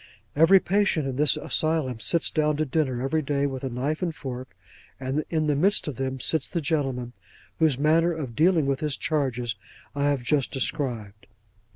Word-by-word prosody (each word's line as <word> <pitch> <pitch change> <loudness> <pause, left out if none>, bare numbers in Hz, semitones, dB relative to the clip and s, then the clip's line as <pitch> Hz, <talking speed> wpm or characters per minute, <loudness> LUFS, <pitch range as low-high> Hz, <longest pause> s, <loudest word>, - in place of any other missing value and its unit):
Every 165 +6 +6
patient 190 -6 +1
in 130 -1 -4
this 150 -2 +5
asylum 155 -7 0
sits 165 +8 +1
down 150 -1 +1
to 155 - 0
dinner 130 -4 -1
every 155 +4 0
day 140 -1 -1
with 135 -2 -4
a 135 - -2
knife 135 +7 -3
and 170 -3 -2
fork; 130 -3 -7 0.5
and 135 +3 -2
in 160 -2 0
the 150 -1 +1
midst 190 +7 +3
of 145 - -5
them 135 0 -3
sits 155 +2 +1
the 170 - -2
gentleman, 135 -5 -2 0.5
whose 155 -5 +3
manner 160 +4 +3
of 145 -8 -5
dealing 165 -1 +3
with 135 -1 0
his 150 -3 -2
charges, 125 -6 -1 0.4
I 140 0 -1
have 140 -3 0
just 140 +1 0
described. 115 -6 -3
145 Hz, 185 wpm, -25 LUFS, 130-155 Hz, 0.5 s, Every